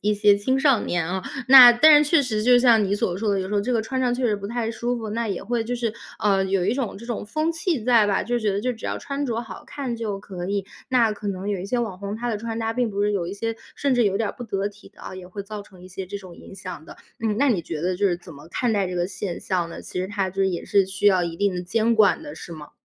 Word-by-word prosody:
一 210 +1 +1
些 205 0 +5
青 260 +6 0
少 270 -7 +4
年 170 -2 -1
哦， 185 0 -2 0.3
那 255 -2 +11
但 295 +4 +7
是 - - -4
确 330 - +5
实 215 -4 -2
就 245 +1 +6
像 235 -3 +5
你 195 - 0
所 180 -3 -1
说 210 +1 -1
的， 200 - +1
有 185 - -3
时 210 - -3
候 205 - +3
这 250 +5 -2
个 230 - +2
穿 260 +4 -3
上 250 -1 +1
确 255 0 -2
实 215 - +1
不 200 0 -6
太 230 0 -2
舒 240 +2 -2
服， 220 -2 -5
那 230 0 -2
也 195 - -3
会 235 +2 -1
就 245 +2 -2
是， 230 -3 -2 0.3
呃， 195 -2 +2
有 190 -1 0
一 - - +1
种 250 -7 -3
这 235 - -11
种 235 -3 -4
风 310 +9 -1
气 325 - -1
在 235 -4 +5
吧。 200 - +1
就 240 +1 -1
觉 215 -3 0
得 200 - -1
就 250 +2 -1
只 225 - -12
要 - - -2
穿 280 +1 -4
着 230 -2 -2
好 230 - -10
看 275 -5 -4
就 210 -4 -3
可 185 -3 -7
以， 200 0 -1 0.2
那 235 -4 +3
可 205 0 -6
能 195 +1 -4
有 200 -3 -1
一 190 - -5
些 245 +4 -1
网 215 -6 -3
红， 200 +1 -5
他 240 +1 -3
的 220 - -1
穿 225 +1 -5
搭 225 0 -1
并 245 -2 0
不 200 0 -1
是 210 0 +1
有 180 -4 -1
一 - - -5
些 225 +3 -3 0.2
甚 280 -2 +1
至 245 -2 +3
有 195 -1 +1
点 220 -1 0
儿 - - -16
不 245 - -7
得 200 -3 -2
体 205 0 -16
的 - - -20
啊， - - -8
也 185 -1 -10
会 200 +2 -6
造 210 0 -7
成 185 -3 -17
一 185 - -11
些 190 +1 -6
这 200 +2 -6
种 185 -3 -12
影 - - -13
响 185 -4 -8
的。 - - -12 0.2
嗯， 220 -2 0
那 280 +1 +3
你 190 -9 +1
觉 155 -2 -5
得 180 +2 0
就 200 +1 +2
是 175 - 0
怎 175 -2 -13
么 145 +3 -13
看 240 +5 0
待 200 -3 +1
这 180 - -4
个 175 0 0
现 190 -2 -5
象 175 -3 -2
呢？ - - -8
其 180 - -5
实 185 - -3
它 195 -2 -1
这 195 +1 0
也 180 -2 -3
是 200 -1 +3
需 195 +2 -2
要 185 -3 +5
一 165 -1 -3
定 200 -1 +1
的 180 - -3
监 225 +5 +1
管 215 +2 +4
的， 295 - -8
是 - - -10
吗？ 150 -2 -10
210 Hz, 340 characters per minute, -23 LUFS, 190-235 Hz, 0.3 s, 那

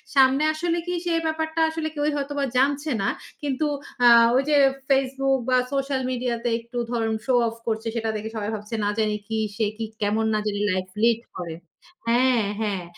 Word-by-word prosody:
সামনে 270 +2 +5
আসলে 340 +2 -1
কি 355 - -1
সে 345 - +1
ব্যাপারটা 320 0 -1
আসলে 320 0 -3
কেউই 295 +1 +1
হয়তোবা 285 0 -2
জানছে 285 +3 +2
না। 195 - +1 0.3
কিন্তু 290 +1 -1 0.4
আ - - +9 0.3
ওই 270 - +3
যে 295 - +4 0.3
Facebook 270 0 +2
বা 255 - +4 0.2
সোশ্যাল 275 -1 0
মিডিয়াতে 245 -1 -1
একটু 235 +2 -9
ধরুন 225 -2 0
শো 260 - +1
অফ 225 - -4
করছে 225 0 -1
সেটা 225 -1 -1
দেখে 215 +1 -4
সবাই 210 0 -2
ভাবছে 210 +2 -6
না 205 - +1
জানি 215 -1 +1
কি, 220 0 -2 0.2
সে 220 +1 +1
কি 225 - -3 0.2
কেমন 215 +2 +1
না 215 - +2
জানি 205 -1 -1
লাইফ 185 0 -1 0.2
লিড 235 -1 +4 0.2
করে 170 -3 -5 0.5
হ্যাঁ, 240 -2 +3 0.2
হ্যাঁ। 200 -4 -1
245 Hz, 185 wpm, -24 LUFS, 220-280 Hz, 0.5 s, আ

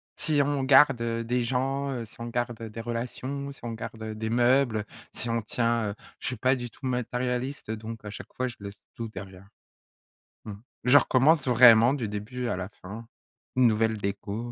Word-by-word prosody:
Si 150 -3 +2
on 140 -1 0
garde, 135 -2 +6
heu, 115 0 -1
des 125 +1 0
gens, 135 +2 -1
heu, 120 -3 -3
si 115 - -17
on 115 - -5
garde, 120 -1 -2
heu, 115 - -5
des 115 +2 -7
relations, 130 +4 -4
si - - -19
on 120 - -4
garde, 110 0 -7
heu, 110 -1 -5
des 110 0 -3
meubles, 120 0 +3
heu, - - -3 0.3
si 120 - -2
on 115 0 0
tient 115 -1 0
heu, - - -9 0.2
je - - -4
suis 130 - -1
pas 130 +1 +3
du 120 -1 -5
tout 130 - -12
matérialiste, 125 0 -2
donc 110 0 -6
à - - -5
chaque 105 - -10
fois 130 0 -1
je 120 - -10
laisse 100 0 -7 0.2
tout 115 -1 -4
derrière. 95 -1 -10 1.0
Mmh. 105 - -6 0.3
Je 125 +4 +7
recommence 135 +3 +3
vraiment 120 0 +7
du 120 -6 -3
début 110 +5 -4
à 90 - -1
la 95 +1 -4
fin. 110 +5 -8 0.5
Nouvelle 110 -3 +3
déco, 100 +4 -4
120 Hz, 205 wpm, -27 LUFS, 110-130 Hz, 1.0 s, Je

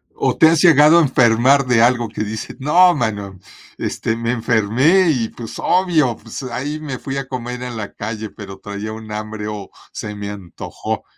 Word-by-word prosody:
¿O - - 0
te 160 - +7
has 165 -1 +2
llegado 160 -1 +7
a - - +5
enfermar 130 0 +3
de 120 -2 +3
algo 120 -2 +2
que 110 -1 -4
dices: 110 +1 -6
"No, 175 +7 +5
hermano, 105 - -3 0.4
este, 115 - -2
me 115 +1 -2
enfermé 125 - +2
y, 120 -7 0
pues, 115 -2 -9
obvio, 165 -10 +2
pues, - - -9
ahí 140 +5 -4
me 140 -5 -6
fui 135 0 -5
a 135 -1 -4
comer 125 -1 -5
en 120 -2 -6
la 105 -2 -6
calle, 110 0 -5
pero 95 -2 -10
traía 100 +1 -6
un 110 -1 -9
hambre 105 0 -5
o 105 -2 -6 0.2
se 105 -1 -6
me 100 0 -6
antojó 100 -4 -6
120 Hz, 190 wpm, -19 LUFS, 110-140 Hz, 0.4 s, te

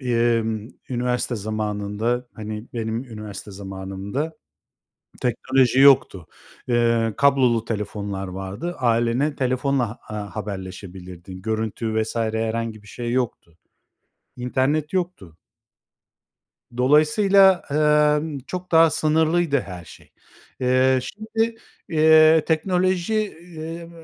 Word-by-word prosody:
emm, 115 -3 0 0.2
üniversite 125 0 -1
zamanında, 110 +3 -2
hani, 110 +1 -6
benim 115 +1 -3
üniversite 105 -4 -8
zamanımda 95 +9 -5 0.9
teknoloji 130 +1 +2
yoktu. 130 - +5 0.4
Eee, 115 -2 +2
kablolu 130 -5 +3
telefonlar 100 -3 -4
vardı. 95 - -5
Ailene 120 +4 +1
telefonla 130 0 0
a 110 +1 -6
ha 105 -1 -6
haberleşebilirdin. 95 -2 -8
Görüntü 110 +1 -1
vs. 110 - -5
herhangi 110 -1 -2
bir 105 - -17
şey 120 +2 -4
yoktu. 120 -9 -3 0.8
İnternet 135 +5 0
yoktu. 175 - -3 1.4
Dolayısıyla, 175 +8 +5
emm, 150 0 +2
çok 180 0 -6
daha 165 0 +6
sınırlıydı 155 0 +2
her 90 -3 -9
şey. - - -16 0.5
Eee, 130 +1 +3
şimdi, 225 - -2 0.3
eee, 155 0 +6
teknoloji, 180 +3 +1 0.4
eee, 165 +2 -7
120 Hz, 95 wpm, -23 LUFS, 105-150 Hz, 1.4 s, daha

